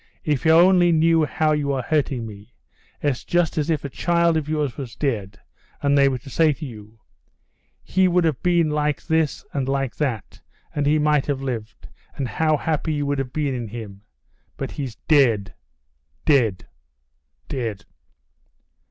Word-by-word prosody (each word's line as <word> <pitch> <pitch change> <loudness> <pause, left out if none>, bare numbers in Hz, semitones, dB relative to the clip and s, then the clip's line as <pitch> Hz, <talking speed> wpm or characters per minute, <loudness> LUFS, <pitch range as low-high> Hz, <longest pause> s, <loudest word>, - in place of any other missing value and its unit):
"If 150 -2 -1
you 160 - +6
only 175 +1 +6
knew 165 0 +4
how 155 +1 0
you 145 -2 0
are 130 -2 -2
hurting 140 -6 0
me. 105 +1 -12 0.5
It's 145 -4 0
just 175 -2 +1
as 150 +2 -1
if 155 -3 0
a - - -3
child 170 +4 +1
of 155 -2 -1
yours 150 -4 -1
were 135 -3 -5
dead, 105 -9 -2 0.4
and 140 0 +2
they 140 -1 +5
were 130 - -2
to 125 - -12
say 160 +1 +3
to 150 - -8
you: 110 -3 -11 0.9
He 190 0 +2
would 180 0 +2
have 155 -6 0
been 170 -3 +2
like 150 -1 -1
this 160 -2 0
and 135 -2 -1
like 135 -2 -1
that, 125 -9 -3 0.3
and 145 -1 0
he 150 +1 +4
might 150 -2 +2
have 140 -2 -2
lived, 115 -4 -5 0.3
and 135 -3 -2
how 155 +3 +1
happy 155 +1 -1
you 145 -1 -1
would 140 0 -1
have 130 -2 -3
been 145 -2 -1
in 120 -3 -4
him. 105 -3 -8 0.6
But 135 - -4
he's 135 -6 -5
dead, 115 -10 +3 0.7
dead, 120 - +2 0.8
dead!..." 115 -6 -4
145 Hz, 170 wpm, -22 LUFS, 125-155 Hz, 0.9 s, you